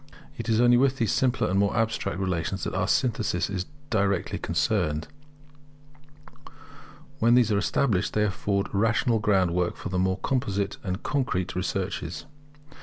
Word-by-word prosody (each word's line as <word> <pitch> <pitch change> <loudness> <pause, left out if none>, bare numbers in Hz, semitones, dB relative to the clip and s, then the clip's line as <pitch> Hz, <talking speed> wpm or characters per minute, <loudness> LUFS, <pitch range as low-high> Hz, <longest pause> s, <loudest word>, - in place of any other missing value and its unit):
It 115 0 -5
is 110 0 +3
only 120 0 +5
with 135 +1 +2
these 115 -5 +1
simpler 130 -1 +1
and 95 +2 +1
more 100 +2 +1
abstract 110 -5 -1
relations 95 0 -2
that - - -3
our 95 0 0
synthesis 110 -7 0
is 95 -1 -3 0.2
directly 100 -4 0
concerned: 80 -7 0 2.1
when 115 +2 +4
these 120 -3 +4
are 105 - +2
established, 100 -1 0
they 105 - +2
afford 100 -1 -1
a - - 0
rational 115 +1 +2
groundwork 90 -4 +1
for - - -6
the 90 0 -1
more 95 +1 +1
composite 100 -7 -1
and 95 0 -4
concrete 125 -11 -1
researches. 95 +5 -3
100 Hz, 150 wpm, -26 LUFS, 95-115 Hz, 2.1 s, only